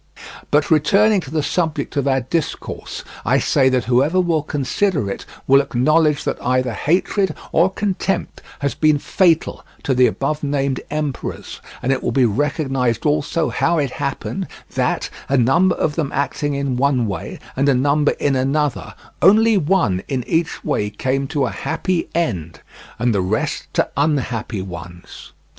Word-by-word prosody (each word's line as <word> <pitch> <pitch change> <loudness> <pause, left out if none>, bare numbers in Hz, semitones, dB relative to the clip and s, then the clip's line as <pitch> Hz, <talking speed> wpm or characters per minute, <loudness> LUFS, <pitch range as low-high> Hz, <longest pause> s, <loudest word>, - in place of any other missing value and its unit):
But 150 +2 +2
returning 195 +7 +4
to 145 - -10
the 155 0 -1
subject 160 -2 -1
of 140 -1 0
our 135 -1 +2
discourse, 155 +6 -4 0.2
I - - +3
say 130 -2 +3
that 130 -2 0
whoever 135 +9 +2
will 170 -4 +2
consider 145 - -1
it - - -7 0.2
will 135 +1 +6
acknowledge 150 +4 +2
that - - -3
either 130 -1 +1
hatred 185 - 0 0.2
or 170 +4 +4
contempt 195 -1 -2 0.2
has 140 -1 0
been 155 -1 +3
fatal 170 +2 +1 0.2
to 135 - +1
the 125 0 +5
above 150 +2 -2
named 140 -2 -1
emperors, 150 -3 -4 0.2
and 130 - +1
it 135 - 0
will - - -1
be 135 -2 +3
recognized 135 0 0
also 150 +2 +1
how 170 0 +1
it 140 -4 0
happened 145 +7 -3 0.3
that, - - -1 0.2
a 140 - +3
number 165 +10 +3
of 150 - 0
them 150 -3 -2
acting 145 +1 -1
in 140 -2 -1
one 130 -2 +2
way 100 -3 -5 0.2
and 140 +2 +2
a 135 - +4
number 145 +3 +2
in 140 -2 0
another, 135 +2 -1 0.3
only 220 +5 +6
one 160 - +2
in 130 -3 -2
each 165 +2 -1
way 105 - 0
came 130 +6 -1
to 140 -1 0
a 120 - -3
happy 165 +2 -2
end 90 - -2 0.4
and 120 0 +1
the 100 - +1
rest 95 +4 -2
to - - +2
unhappy 125 -8 -1
ones. 85 -1 -10
140 Hz, 160 wpm, -20 LUFS, 130-160 Hz, 0.4 s, will